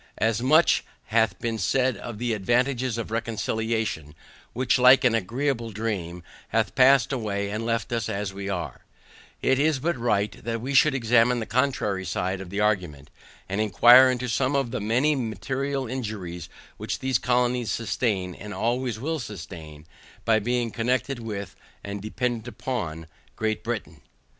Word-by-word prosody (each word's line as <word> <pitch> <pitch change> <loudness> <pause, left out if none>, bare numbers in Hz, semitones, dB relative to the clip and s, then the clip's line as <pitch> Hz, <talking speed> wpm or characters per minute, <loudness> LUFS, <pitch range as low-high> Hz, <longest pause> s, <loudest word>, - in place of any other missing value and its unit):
As 110 +2 +1
much 155 +6 +4 0.3
hath 110 -5 +3
been 115 -1 -3
said 130 +5 +1
of 120 -3 -7
the 120 +1 -1
advantages 120 +3 0
of 115 -1 -5
reconciliation, 110 -7 -2 0.4
which, 125 +1 +1
like 125 +2 +7
an 125 -3 +4
agreeable 115 +3 -1
dream, 100 -6 -4 0.2
hath 115 0 0
passed 135 0 +5
away 100 -5 -2
and 110 +2 -3
left 115 0 -1
us 115 -2 -1
as 100 -2 -3
we 100 0 -5
were, 90 -3 -4 0.6
it 130 0 +3
is 150 0 +3
but 165 +5 -1
right, 105 -4 -1
that 115 +1 -2
we 130 +5 -4
should 135 +1 +5
examine 120 0 +3
the 110 - -3
contrary 115 -7 0
side 95 +1 -2
of 95 - -8
the 100 +2 -3
argument, 90 -9 -1 0.4
and 100 +3 -1
inquire 120 +5 +7
into 125 0 -1
some 130 +3 0
of 135 -4 0
the - - -3
many 125 +8 +2
material 135 +3 -2
injuries 105 -9 -5 0.3
which - - -3
these 130 -2 0
colonies 125 -1 +1
sustain, 100 -4 -1
and 105 +4 -8
always 120 -1 -1
will 160 +5 -2
sustain, 80 - -9 0.4
by 110 -1 +4
being 120 +1 -1
connected 125 +3 -1
with, 105 -4 -6 0.3
and 100 0 -5
dependant 120 +2 -3 0.2
on 85 -11 -3 0.3
Great 110 0 -2
Britain. 110 -10 -5
115 Hz, 155 wpm, -25 LUFS, 100-125 Hz, 0.6 s, like